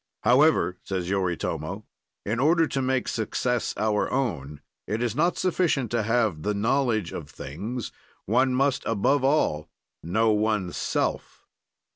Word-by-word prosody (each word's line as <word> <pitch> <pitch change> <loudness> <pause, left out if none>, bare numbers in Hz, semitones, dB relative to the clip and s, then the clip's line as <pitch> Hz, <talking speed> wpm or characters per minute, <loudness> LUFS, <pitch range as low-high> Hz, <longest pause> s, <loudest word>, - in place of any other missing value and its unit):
"However," 120 - +4
says 95 -1 -3
Yoritomo, 95 -4 -2 0.4
"in 110 +3 -1
order 165 +4 +4
to 135 -3 -2
make 130 -1 0
success 120 +2 -1
our 105 -1 0
own, 80 - -2 0.3
it 110 +3 -1
is 120 -1 -1
not 170 +4 +1
sufficient 165 - 0
to 120 -1 +1
have 110 -7 +1
the 105 +3 -1
knowledge 115 -3 +1
of 75 -3 -7
things, 100 - -6 0.3
one 130 +5 +2
must 135 0 +1
above 125 +6 +2
all 135 - +1 0.3
know 110 +7 +2
oneself. 105 -4 -1
115 Hz, 130 wpm, -26 LUFS, 95-130 Hz, 0.4 s, However